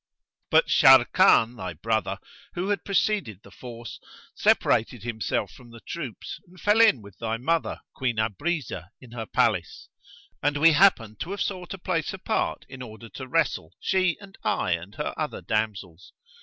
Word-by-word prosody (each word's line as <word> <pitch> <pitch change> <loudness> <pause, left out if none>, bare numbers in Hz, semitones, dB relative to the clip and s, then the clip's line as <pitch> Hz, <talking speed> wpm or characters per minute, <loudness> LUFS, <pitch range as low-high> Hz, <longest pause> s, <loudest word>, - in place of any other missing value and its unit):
But - - +5
Sharrkan, 115 +2 +6
thy 90 -5 -5
brother, 100 +2 -1 0.4
who 180 +3 -2
had 200 -4 -1
preceded 195 - 0
the - - -15
force, 120 -3 -9 0.3
separated 115 0 +2
himself 110 -4 -2
from 125 -2 -15
the 115 0 -12
troops 150 -10 -7
and 180 +1 -18
fell 210 +6 +4
in 175 - +5
with 100 -1 -15
thy 115 0 -2
mother 165 +7 -1
Queen 125 -3 -1
Abrizah 110 - -2
in 125 -3 -15
her 115 -2 -6
palace; 90 -7 0 0.5
and 145 +1 +1
we 165 +3 +6
happened 145 - +3
to 170 - -5
have 200 +1 -4
sought 185 -1 -5
a - - -11
place 175 -3 -2
apart 220 +4 -2
in 130 -1 -10
order 115 -1 -10
to 130 +3 -8
wrestle, 165 +5 -1
she 185 -2 +1
and 195 -1 -15
I - - 0
and 85 +4 -3
her 150 - -3
other 155 -1 -3
damsels. 100 -6 -3
125 Hz, 165 wpm, -26 LUFS, 110-175 Hz, 0.5 s, Sharrkan